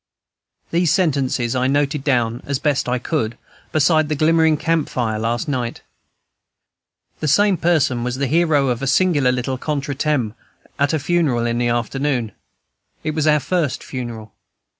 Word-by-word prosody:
These 170 -1 +2
sentences 135 -8 +1
I 130 0 +1
noted 145 +1 0
down, 120 -4 0
as 140 -1 0
best 145 -3 0
I 125 - +1
could, 120 -4 -2 0.3
beside 155 0 +3
the 155 - 0
glimmering 160 +1 +3
camp 165 -1 0
fire 110 -3 -2
last 115 +4 -1
night. 125 -5 -3 1.4
The 155 - -2
same 205 +7 +4
person 150 -8 +1
was 125 0 -2
the 140 +1 -1
hero 150 -2 +2
of 120 0 -1
a 135 - -2
singular 145 -3 +3
little 125 +1 -2
contre 145 -1 -2
temps 130 -6 -1 0.4
at 140 0 +2
a - - +2
funeral 145 -6 +1
in 120 0 0
the 120 - +1
afternoon. 120 0 -1 0.7
It 155 - -1
was 155 0 -1
our 150 0 +4
first 160 -3 -1
funeral. 115 -4 -7
140 Hz, 160 wpm, -20 LUFS, 125-155 Hz, 1.4 s, same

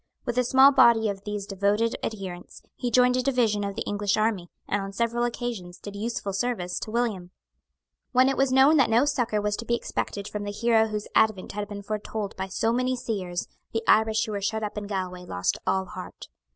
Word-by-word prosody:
With 240 - -2
a - - +3
small 265 +3 +6
body 230 -5 +5
of 200 0 -6
these 205 -1 -4
devoted 205 +4 +1
adherents, 190 -5 -6
he 245 - -2
joined 250 +1 +4
a - - +2
division 240 -6 +1
of 200 0 -3
the - - -3
English 205 0 0
army, 215 -5 0 0.2
and 205 - 0
on 195 0 -6
several 235 +2 0
occasions 230 -7 -4
did 205 -1 -9
useful 205 -2 -3
service 195 -5 -2
to - - -6
William. 215 -6 -1 0.8
When 255 +1 +5
it 270 - +1
was 270 -1 +2
known 270 +4 +6
that 265 - +4
no 235 +5 +4
succour 245 -7 0
was 210 0 0
to 235 - -6
be 235 - +1
expected 200 -3 -4
from 210 -1 -5
the 205 - -4
hero 225 +1 +3
whose 210 -1 -4
advent 215 -4 +2
had 205 0 -4
been 200 -1 -7
foretold 210 0 -4
by 190 0 -4
so 225 +4 0
many 255 +1 +1
seers, 185 -7 -3 0.3
the 225 0 -1
Irish 220 0 +4
who 220 - -6
were 200 -1 -3
shut 220 +2 -1
up 210 - -4
in 210 -1 -5
Galway 185 -3 -4
lost 90 - -1
all 190 0 +1
heart. 185 0 -9
215 Hz, 215 wpm, -26 LUFS, 200-235 Hz, 0.8 s, small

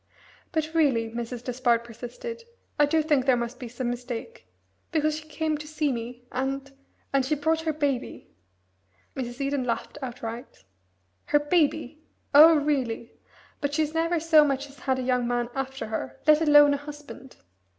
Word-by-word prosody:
"But 315 -1 -2
really," 260 -9 +2
Mrs. 235 +1 -5
Despard 240 -2 +1
persisted, 245 - -8 0.4
"I 295 - +6
do 315 +1 +2
think 290 -4 +1
there 255 -2 +5
must 235 +1 -4
be 245 - -6
some 240 +1 -3
mistake. 245 - -7 0.4
Because 310 -2 +1
she 310 - -15
came 310 0 -2
to 300 - -8
see 305 -1 0
me 240 0 -6
and 270 +1 -3 0.4
and 275 -1 +3
she 275 +4 0
brought 320 +2 +1
her 320 -1 0
baby." 285 -4 -3 0.8
Mrs. 245 -1 -5
Eden 275 -1 -1
laughed 235 +4 -3
outright. 240 -1 -7 0.6
"Her 295 - +3
baby? 305 -1 0 0.3
Oh, 315 +3 +9
really! 270 -6 -1 0.5
But 285 0 -2
she's 310 -1 0
never 330 +1 +1
so 315 -1 +6
much 275 -1 -1
as 275 - -18
had 260 0 0
a 260 - -2
young 250 -1 +1
man 240 0 -1
after 270 0 -4
her, 130 -12 -5
let 305 +1 +6
alone 295 -2 +7
a - - 0
husband. 290 -2 -11
275 Hz, 165 wpm, -26 LUFS, 245-305 Hz, 0.8 s, Oh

